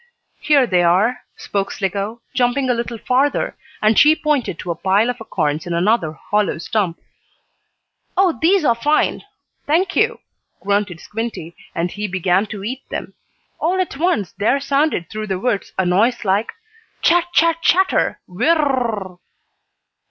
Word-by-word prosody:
"Here 285 -4 +4
they 180 -6 +2
are," 190 +8 +2 0.2
spoke 195 -1 -2
Slicko, 200 +4 -3
jumping 255 +1 +1
a - - +3
little 235 0 -3
farther, 260 +5 0 0.3
and 215 0 +4
she 305 +1 +6
pointed 290 - -1
to 175 - -4
a - - -3
pile 200 +7 +2
of 245 - -9
acorns 150 -7 -2
in 170 - -2
another 175 -3 +1
hollow 205 +4 -1
stump. 170 +2 -2 1.2
"Oh, 370 -3 +3
these 350 0 +3
are 235 - +5
fine! 295 +7 +1 0.5
Thank 370 +6 +1
you!" 465 +2 +2 0.4
grunted 200 -3 -1
Squinty, 210 -7 -5 0.2
and 170 +1 -1
he 210 0 -4
began 190 +2 +1
to 200 -1 -7
eat 255 +5 -4
them. - - -5 0.5
All 360 +4 0
at 365 -7 -1
once 300 - 0
there 235 +7 +1
sounded 280 - 0
through 215 +3 -5
the 190 -2 -1
woods 200 0 -2
a 190 - +1
noise 215 +7 +2
like: 200 +3 +1 0.5
"Chat! 345 +1 +4
Chat! 330 -1 +3
Chatter! 375 +3 +2
Whir 190 - +1
r - - +1
r 290 -3 +2
r 240 - +1
r 205 -4 -4
r!" 175 - -22
225 Hz, 165 wpm, -19 LUFS, 190-290 Hz, 1.2 s, she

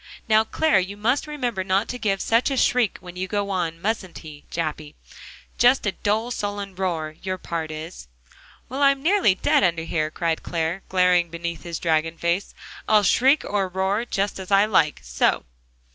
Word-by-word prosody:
"Now, 220 0 +5
Clare, 225 -2 +2
you 190 +2 -4
must 245 +8 0
remember 245 -10 -2
not 195 +3 +1
to 250 - -4
give 195 -4 0
such 230 +4 +2
a 270 - -2
shriek 245 -4 +2
when 180 -1 -11
you 185 +1 -3
go 200 0 -2
on, 170 -3 -2
mustn't 195 -2 -3
he, 150 -2 -11
Jappy? 155 -2 -4 0.6
Just 245 0 +4
a 205 - +1
dull, 220 +5 -1
sullen 205 -3 -4
roar, 165 -5 -3
your 185 -1 -3
part 165 -3 -4
is." 155 - -8 0.6
"Well, 265 +3 -5
I'm 275 -1 +3
nearly 360 - +3
dead 195 - +2
under 170 -3 +1
here," 155 -2 -1
cried 165 0 -2
Clare, 170 +2 -2
glaring 180 -2 +3
beneath 170 0 -5
his 170 -2 -5
dragon 160 0 0
face. 170 +3 -1 0.3
"I'll 215 -1 +5
shriek, 265 +9 +3
or 200 -2 0
roar, 190 +4 0
just 200 -4 -2
as 190 - -8
I 200 0 +5
like, 165 -8 +2
so!" - - 0
190 Hz, 180 wpm, -23 LUFS, 170-215 Hz, 0.6 s, Now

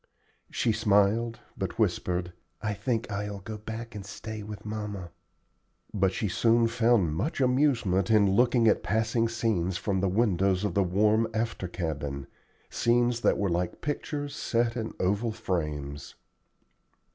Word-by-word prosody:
She 115 - +1
smiled, 110 +1 +2
but - - -4
whispered, 90 0 0 0.3
"I 110 -1 -2
think 110 +2 -2
I'll 100 0 -3
go 105 +3 -7
back 115 +2 -7
and 105 -2 -6
stay 110 +2 -7
with 105 0 -8
mamma;" 105 -5 -5 0.8
but 95 -3 +2
she 105 - -2
soon 115 +5 +3
found 115 -8 +2
much 135 - -2
amusement 125 -8 +2
in 105 -2 +5
looking 120 +2 +4
at 105 - +4
passing 110 +4 +1
scenes 100 -6 0
from 95 -2 -1
the 95 0 +1
windows 95 -2 +2
of 105 -4 -1
the 100 - +3
warm 105 +5 +3
after 110 -4 -2
cabin 75 -6 -4 0.4
scenes 120 0 +1
that - - +3
were 100 - 0
like 85 +1 -1
pictures 145 0 -3
set 115 0 0
in 110 -2 -4
oval 105 +5 +1
frames. 75 -9 -4
105 Hz, 145 wpm, -28 LUFS, 95-115 Hz, 0.8 s, in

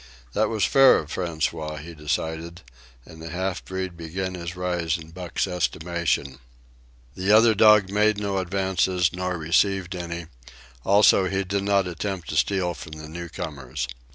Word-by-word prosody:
That - - +1
was 110 -2 +1
fair 135 -1 +6
of 75 -1 -5
François, 80 -3 -2
he 85 +3 -9
decided, 80 +2 -4 0.4
and 80 - -13
the 80 - -7
half 95 +2 -3
breed 95 -1 -5
began 90 +3 -4
his 85 0 -6
rise 90 -2 -1
in 80 -1 -12
Buck's 90 0 -3
estimation. 85 -4 -1 0.7
The 95 +2 0
other 110 +1 +7
dog 105 -2 +5
made 105 +1 +3
no 100 -2 -1
advances, 95 -1 +1
nor 90 0 -2
received 90 +3 +1
any; 85 -1 -5 0.6
also, 100 -1 +5
he 100 +1 -1
did 100 +1 -1
not 100 -1 +3
attempt 90 +1 -4
to - - -3
steal 90 +2 +1
from 75 - -10
the 75 0 -9
newcomers. 80 -5 -5
90 Hz, 155 wpm, -24 LUFS, 80-95 Hz, 0.7 s, other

